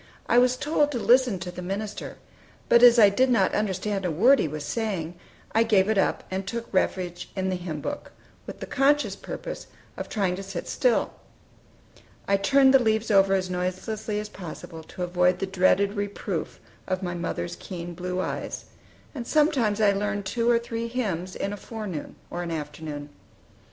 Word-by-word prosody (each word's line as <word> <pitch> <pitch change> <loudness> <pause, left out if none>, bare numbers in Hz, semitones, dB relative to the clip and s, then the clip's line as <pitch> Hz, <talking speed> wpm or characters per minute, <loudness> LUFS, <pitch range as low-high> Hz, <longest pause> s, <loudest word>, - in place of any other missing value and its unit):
I 240 - +4
was 250 0 +3
told 295 +1 +1
to - - -1
listen 245 -2 +4
to 180 -1 -5
the 180 - -7
minister; 200 +3 -5 0.5
but 235 - +6
as 245 -1 +8
I 210 -3 +8
did 255 +6 +2
not 240 - +3
understand 200 -1 -1
a 180 - 0
word 235 - +5
he - - +1
was 150 0 -5
saying, 190 -7 -2 0.4
I 225 - +3
gave 205 -4 +4
it 220 - +2
up, - - +1
and 190 0 -3
took 230 +3 -3
refuge 180 -2 -1
in 190 -1 -1
the 185 - 0
hymn 170 -4 -5
book, 290 - -5 0.4
with - - -8
the - - -3
conscientious 290 +2 +2
purpose - - -7 0.3
of - - -5
trying 195 -5 0
to - - -5
sit 195 -3 -6
still. 250 -4 +1 1.1
I 200 - +4
turned 265 +6 +5
the 270 - +7
leaves 220 -1 +1
over 195 -1 +5
as 185 -1 -1
noiselessly 205 +4 -3
as 210 - -4
possible, 165 -3 -9
to 180 - -6
avoid 180 0 +2
the 195 - -2
dreaded 195 +1 +2
reproof 205 -1 -4 0.3
of 185 0 -2
my 175 -1 -2
mother's 170 - -3
keen 175 -2 -7
blue 180 +1 -3
eyes; - - -4 0.5
and 240 -5 -6
sometimes 275 -9 +2
I 210 -2 +5
learned 205 0 -2
two 230 +4 0
or 235 - +5
three 230 0 -4
hymns 190 -7 -3
in 200 - -3
a - - -5
forenoon 205 -7 -6 0.2
or 175 - -3
an 175 - -4
afternoon. 150 -2 -5
200 Hz, 185 wpm, -26 LUFS, 180-230 Hz, 1.1 s, as